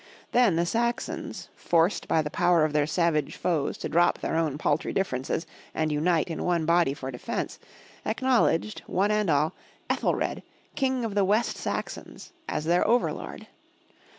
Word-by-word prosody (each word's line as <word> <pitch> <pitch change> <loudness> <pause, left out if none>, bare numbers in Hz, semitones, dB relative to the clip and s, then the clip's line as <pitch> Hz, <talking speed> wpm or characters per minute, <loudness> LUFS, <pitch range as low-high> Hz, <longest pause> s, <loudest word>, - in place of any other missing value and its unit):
Then 240 -8 +4
the 170 +1 +2
Saxons, 235 +6 -2
forced 170 +3 +1
by 160 - +2
the 150 - -4
power 170 -3 +3
of 155 - -2
their 150 -1 +2
savage 160 -2 +1
foes 160 -6 -1
to - - -4
drop 175 +1 +3
their - - -3
own 160 -4 0
paltry 150 0 0
differ 185 -10 0
ences 135 +5 -3 0.3
and 155 -1 0
unite 160 +2 +2
in 165 -3 -4
one 170 -3 +1
body 170 -4 +3
for 135 -2 -6
defence, 125 - -4 0.4
acknowledged, 220 -4 +1
one 200 +3 +1
and 210 -3 +1
all, 150 +1 +2 0.4
Ethelred, - - 0 0.3
King 260 -3 0
of 220 - -3
the 200 -1 +3
West 210 +5 +2
Saxons, - - -5 0.2
as 150 - -2
their 175 +2 +3
over 240 +3 +3
lord. - - -8
170 Hz, 165 wpm, -27 LUFS, 155-210 Hz, 0.4 s, Then